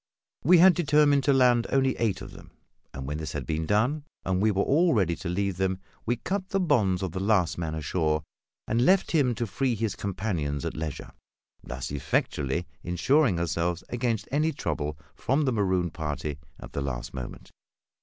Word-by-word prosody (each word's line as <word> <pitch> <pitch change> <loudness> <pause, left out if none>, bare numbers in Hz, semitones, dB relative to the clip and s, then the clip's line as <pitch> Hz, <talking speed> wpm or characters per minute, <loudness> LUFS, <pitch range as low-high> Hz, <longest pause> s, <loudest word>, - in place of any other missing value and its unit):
We 175 +6 +7
had 180 +2 +8
determined 150 -4 +3
to 145 - +4
land 125 -3 +4
only 135 -1 +2
eight 110 -6 0
of - - -9
them; - - -13 0.4
and 65 - -7
when 75 +2 -3
this 80 - -5
had - - -4
been 80 0 -2
done, 125 +9 +1 0.2
and 95 0 0
we 110 - +4
were 100 -1 +1
all 165 +2 +3
ready 90 -5 +2
to 90 - -5
leave 95 0 -1
them, 95 0 0 0.3
we 120 - +2
cut 190 - -3
the 195 - 0
bonds 110 - +2
of 95 - -2
the 95 - -4
last 95 -5 +2
man 80 -2 -3
ashore, 80 0 0 0.4
and 115 +2 +2
left 190 +7 +3
him 135 -7 +2
to 120 - -2
free 125 +3 -1
his 110 -2 -2
companions 90 - -2
at - - -3
leisure, 75 -1 -5 0.5
thus 65 +2 -6
effectually 70 +2 -1 0.2
insuring 95 - +2
ourselves 85 +1 -1
against 120 -3 -1
any 155 +3 +2
trouble 75 - -3 0.2
from 135 +5 0
the 130 - +2
marooned 95 -6 0
party 75 -2 -4 0.2
at - - -11
the 70 - -2
last 65 -3 -4
moment. 65 -2 -8
95 Hz, 185 wpm, -27 LUFS, 80-130 Hz, 0.5 s, had